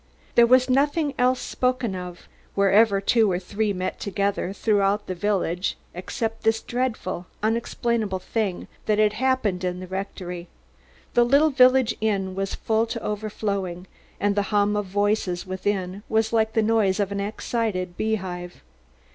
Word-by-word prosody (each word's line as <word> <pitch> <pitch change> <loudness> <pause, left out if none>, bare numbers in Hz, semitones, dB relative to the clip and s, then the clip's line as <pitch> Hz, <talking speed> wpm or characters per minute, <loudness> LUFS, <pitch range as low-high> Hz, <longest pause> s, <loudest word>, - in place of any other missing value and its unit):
There 235 0 +6
was 255 +1 +5
nothing 290 +3 +2
else 250 +1 +3
spoken 250 -4 -1
of 180 -1 -8 0.3
wherever 200 +1 +4
two 215 +1 +3
or 175 - +1
three 205 +3 -1
met 185 -1 -3
together 200 -1 -1
throughout 205 0 +1
the 185 - -3
village 185 -2 -1 0.2
except 225 +5 -4
this 225 0 +2
dreadful, 240 -8 -3 0.2
unexplainable 225 -2 0
thing 190 0 -3 0.2
that 215 -1 +3
had 210 -1 +3
happened 220 -6 0
in 180 0 -2
the 185 - -6
rectory. 180 -2 -5 0.7
The 240 - +5
little 280 +6 +4
village 255 -2 +5
inn 195 -3 0
was 195 +1 -3
full 225 +1 0
to 230 0 -5
overflowing 200 -4 -3 0.3
and 205 0 +1
the 205 - +2
hum 205 0 +2
of 205 -1 -1
voices 205 -2 0
within 190 0 -2
was 220 +1 +1
like 220 -1 +2
the 225 - +2
noise 215 -3 +2
of 200 -1 0
an 200 - -2
excited 200 -3 -2
beehive. 180 -5 -3
205 Hz, 150 wpm, -24 LUFS, 190-225 Hz, 0.7 s, There